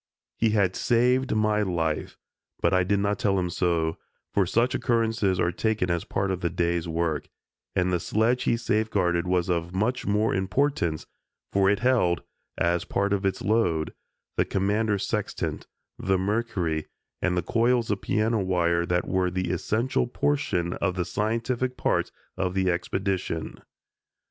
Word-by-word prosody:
He 115 - +2
had 100 -4 +2
saved 125 +1 +2
my 105 0 +2
life, 85 -6 -1 0.4
but - - +2
I 95 -1 +4
did 100 +3 +1
not 100 +2 0
tell 100 -6 +2
him 90 -2 -1
so, 85 -2 0 0.3
for 100 -3 +2
such 120 +7 +2
occurrences 115 -6 +1
are 85 - +2
taken 105 -1 0
as 85 -1 -1
part 95 0 -1
of 90 -1 -3
the 85 - +1
day's 85 0 0
work, 80 -2 -1 0.5
and 90 0 +1
the 90 - +2
sledge 115 +8 +1
he 115 - +2
safeguarded 100 -6 +1
was 90 -1 +1
of 85 0 -1
much 125 +6 0
more 105 +2 +2
importance, 95 - 0 0.5
for 95 -1 +4
it 105 +3 +1
held, 115 -10 +2 0.3
as 85 0 +1
part 100 +1 0
of 100 -1 +1
its 95 - -2
load, 90 -8 +1 0.4
the - - +4
Commander's 100 +1 0
sextant, - - -3 0.3
the 95 0 +1
mercury, 95 -6 -1 0.3
and 90 -1 +1
the 90 - +1
coils 115 +3 +2
of 100 - -1
piano 110 +1 +1
wire 85 -2 +1
that 90 -1 0
were 95 -1 +1
the 90 -1 -2
essential 120 +8 0
portion 120 -11 0
of 95 -2 +1
the 90 -2 -1
scientific 115 +6 -1
part - - 0 0.3
of 95 0 -1
the 95 -1 +2
expedition. 90 -2 -2
95 Hz, 160 wpm, -26 LUFS, 90-110 Hz, 0.5 s, I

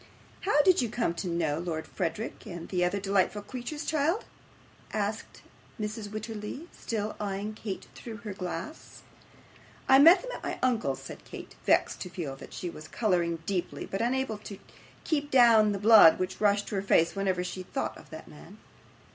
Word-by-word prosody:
'How 295 -7 +3
did 370 -3 +5
you 240 - -1
come 230 -6 0
to 175 +2 -4
know 165 -3 0
Lord 165 -2 -3
Frederick, 190 +6 -4
and 175 -4 -7
those 180 -2 0
other 180 +3 +1
delightful 200 +1 +1
creatures, 260 +6 -6
child?' 320 +6 0 0.7
asked 215 +1 -3 0.4
Mrs. 210 0 -4
Wititterly, 215 +7 -6
still 215 -2 -4
eyeing 205 +1 -3
Kate 210 -3 -6
through 225 -2 -8
her 210 - -4
glass. 185 - -7 0.8
'I 265 0 +7
met 335 - +8
them - - -6
at - - -7
my - - -4
uncle's,' 225 - 0
said - - -9
Kate, - - -10
vexed - - +3
to 180 - -5
feel 160 -7 -5
that - - -12
she 180 - -5
was 155 -2 -8
colouring 170 -6 0
deeply, 185 -2 -2
but 195 - -3
unable 245 -2 0
to 205 -1 -9 0.5
keep 290 -3 -1
down 230 -5 +6
the 200 - -1
blood 210 -5 +8
which 185 +2 -4
rushed 205 -1 +2
to - - -3
her - - 0
face 170 -3 +3
whenever 190 -2 0
she 185 +1 -5
thought 185 - -3
of - - -15
that 160 0 -10
man. 165 +7 -13
205 Hz, 180 wpm, -29 LUFS, 180-230 Hz, 0.8 s, met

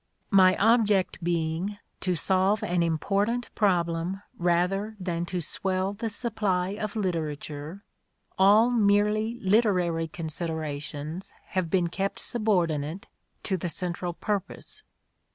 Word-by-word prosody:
My 185 -2 +6
object 210 -5 +3
being 170 +4 -1 0.2
to 185 -1 0
solve 190 +6 +2
an 180 -4 +1
important 200 +9 0
problem 175 -1 0
rather 180 +5 +1
than 175 -2 -2
to 180 -1 -2
swell 190 +4 -1
the 225 +2 -3
supply 205 -5 -1
of 210 +1 -4
literature, 160 -2 -3 0.5
all 210 +5 +5
merely 215 +1 +2
literary 185 -6 +2
considerations 160 0 -5 0.2
have 185 -3 -1
been 175 -1 +2
kept 195 +3 -2
subordinate 175 -7 0 0.4
to 190 - 0
the 175 0 -3
central 175 0 -3
purpose. 200 +1 -4
185 Hz, 110 wpm, -27 LUFS, 170-205 Hz, 0.5 s, My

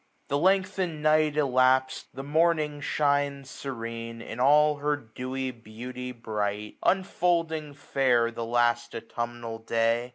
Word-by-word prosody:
The 140 - +1
lengthened 185 -3 +1
night 155 -1 +3
elaps'd, 130 -2 +2
the 135 - -7
morning 155 0 +1
shines 140 -2 0
Serene, 115 -3 -6
in 115 0 -8
all 150 +3 +5
her 145 +1 +1
dewy 130 +1 -5
beauty 125 +2 -8
bright; 105 -3 -3
Unfolding 165 -5 0
fair 130 -4 +2
the 115 0 -5
last 120 0 +1
autumnal 120 0 -5
day. 115 +1 +1
130 Hz, 120 wpm, -27 LUFS, 115-150 Hz, -, all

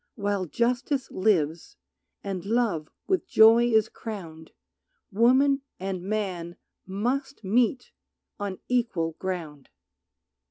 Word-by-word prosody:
While 200 -3 -1
justice 250 - -1
lives, 170 -6 0 0.5
and 190 -3 -4
love 200 -8 0 0.2
with 375 -1 0
joy 225 -1 +7
is 220 -2 +3
crowned 170 -9 -8 0.6
Woman 260 +6 +4 0.2
and 190 -1 -3
man 185 -4 -3 0.3
must 245 +8 -2
meet 240 +5 +1 0.5
on 200 -2 -3
equal 230 -10 0
ground. 165 -7 -5
205 Hz, 95 wpm, -26 LUFS, 180-240 Hz, 0.6 s, joy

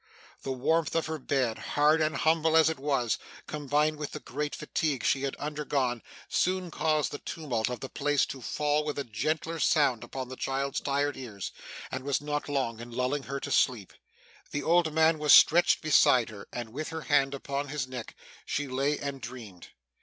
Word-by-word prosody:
The 135 - -4
warmth 155 +5 +1
of 165 - +1
her 160 0 -4
bed, 130 -4 0 0.2
hard 150 +2 +5
and 155 0 +1
humble 160 0 +3
as 160 0 +5
it 160 - -6
was, 135 -5 0 0.3
combined 150 +1 0
with 150 -1 -5
the 150 - -5
great 145 +2 -4
fatigue 150 -3 -2
she 135 - +2
had 140 -1 -2
undergone, 140 -5 -2 0.3
soon 185 -1 0
caused 155 -1 +1
the 145 - -5
tumult 125 -9 -2
of 125 - -5
the 135 - -4
place 145 -1 +1
to 135 - -8
fall 150 +5 0
with 150 -1 -3
a 140 - -1
gentler 155 +8 -2
sound 145 -7 +3
upon 130 -1 -6
the 130 - -7
child's 135 +1 -2
tired 145 +1 0
ears, 110 -7 -6 0.4
and 130 0 -4
was 140 0 0
not 145 0 -3
long 130 -5 -1
in 120 +1 -8
lulling 125 +4 -1
her 140 0 -2
to - - -5
sleep. 115 -8 +1 0.6
The 145 - -3
old 170 -1 +3
man 160 0 +3
was 150 -1 +5
stretched 175 +1 +6
beside 130 -5 +5
her, 100 -2 -10
and 120 -2 -5
with 150 +7 -5
her 160 0 -5
hand 140 -2 +2
upon 140 +1 -3
his 140 -2 -3
neck 125 -3 -7 0.3
she 145 0 -2
lay 135 +3 0
and 140 -1 -5
dreamed. 115 -7 -9
145 Hz, 190 wpm, -29 LUFS, 130-150 Hz, 0.6 s, stretched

